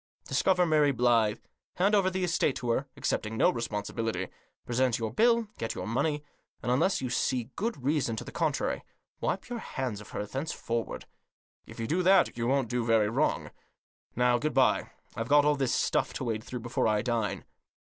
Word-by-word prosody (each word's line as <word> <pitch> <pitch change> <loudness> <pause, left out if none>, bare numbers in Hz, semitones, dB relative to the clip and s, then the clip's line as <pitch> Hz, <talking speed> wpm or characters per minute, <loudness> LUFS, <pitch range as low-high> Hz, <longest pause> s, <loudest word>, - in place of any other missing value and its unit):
Discover 180 -2 +3
Mary 155 -3 +4
Blyth; 115 -3 +2 0.3
hand 195 +4 +2
over 195 -3 +4
the 185 0 -2
estate 165 -5 +1
to 120 -2 -2
her, 135 +4 0
accepting 110 +1 -2
no - - +5
responsibility; 110 -3 -3 0.4
present 125 0 +1
your 110 -1 -3
bill, 235 - +4 0.2
get 115 - -3
your - - -4
money; 145 +6 0 0.4
and, 120 - 0
unless 165 +10 +2
you 130 -2 -3
see 125 -1 0
good 225 - -3
reason 140 -5 +1
to - - -5
the - - -9
contrary, - - -1 0.4
wipe 190 - -2
your 245 -1 -4
hands 125 - -4
of 105 - -13
her 105 - -4
thence 135 +9 -4
forward. 115 -1 -3 0.6
If - - -11
you 115 - -2
do 170 +10 +1
that 190 +2 +4
you 115 0 -1
won't 135 -1 +2
do 125 +1 -1
very 115 -2 +3
far - - -6
wrong. 145 +5 0 0.6
Now, 125 0 +3
good 155 +3 -2
bye; 130 -1 +3 0.3
I've 115 +1 -3
got 145 0 +6
all 150 0 +4
this 135 -3 0
stuff - - +1
to - - -4
wade 110 -3 -2
through 125 0 -6
before 120 0 0
I 105 -1 +2
dine." 115 -3 -1
125 Hz, 195 wpm, -29 LUFS, 115-150 Hz, 0.6 s, got